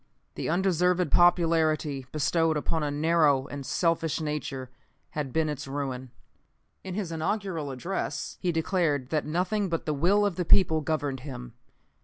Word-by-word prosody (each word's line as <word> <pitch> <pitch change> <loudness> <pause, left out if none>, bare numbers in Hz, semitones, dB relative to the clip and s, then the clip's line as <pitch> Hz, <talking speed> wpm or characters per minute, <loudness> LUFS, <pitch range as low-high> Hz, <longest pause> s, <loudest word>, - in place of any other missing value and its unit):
The - - -3
undeserved 180 -1 +2
popularity 160 -5 +3
bestowed 160 +1 +1
upon 160 +2 -1
a 150 - 0
narrow 150 -2 +3
and 140 0 -7
selfish 165 +2 0
nature 145 -4 -4 0.4
had 145 -3 -3
been 160 +2 +1
its 150 -1 -4
ruin. 135 -2 -4 0.7
In 185 -1 -5
his 195 -5 -3
inaugural 165 -2 -2
address 140 +9 -4
he 180 - +1
declared 160 -5 0
that 155 -2 -1
nothing 185 +5 0
but 165 -1 -2
the 155 - 0
will 190 +8 +3
of 200 -3 -1
the 180 - 0
people 160 -2 +4
governed 145 -3 -2
him. 125 -3 -8
160 Hz, 150 wpm, -27 LUFS, 145-175 Hz, 0.7 s, people